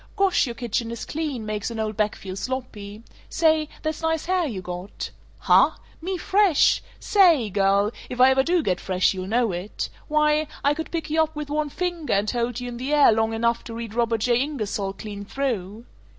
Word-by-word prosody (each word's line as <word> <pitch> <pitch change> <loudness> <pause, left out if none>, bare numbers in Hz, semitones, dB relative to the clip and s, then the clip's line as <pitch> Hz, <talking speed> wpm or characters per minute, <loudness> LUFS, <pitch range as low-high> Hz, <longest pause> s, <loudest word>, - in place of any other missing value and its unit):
Gosh, 390 -7 +3
your 235 - -5
kitchen 235 -1 -2
is 235 0 -5
clean; 295 -7 -3
makes 215 0 -3
an 230 -1 -6
old 215 -1 -2
bach 210 0 0
feel 185 -1 -7
sloppy. 215 -2 -5 0.3
Say, 315 -2 +2
that's 310 0 -2
nice 320 -1 0
hair 365 -2 +1
you 215 -8 -4
got. 180 +2 -6 0.3
Huh? - - +4 0.3
Me 370 +3 -2
fresh? 385 -3 +3 0.2
Saaaay, 330 - +4
girl, 200 +1 +3 0.2
if 250 - -6
I 260 +1 +7
ever 265 0 +4
do 335 +3 +1
get 180 -5 0
fresh, 185 0 +1
you'll 185 -1 -5
know 230 +1 +1
it. 180 +4 -4 0.2
Why, 300 0 +2 0.2
I 285 - +4
could 320 +2 -5
pick 330 -3 -4
you 320 +1 +3
up 315 0 -1
with 300 -1 -5
one 300 0 0
finger, 350 -1 -2
and 205 +1 +1
hold 240 0 -2
you 250 - -5
in 240 -1 -6
the 260 +4 -4
air 295 -4 +6
long 220 0 +1
enough 235 +1 0
to 230 - -7
read 230 -2 -6
Robert 230 -1 0
J. 240 +1 +3
Ingersoll 215 -9 -2
clean 205 0 -7
through. 225 -3 -3
240 Hz, 205 wpm, -24 LUFS, 210-305 Hz, 0.3 s, I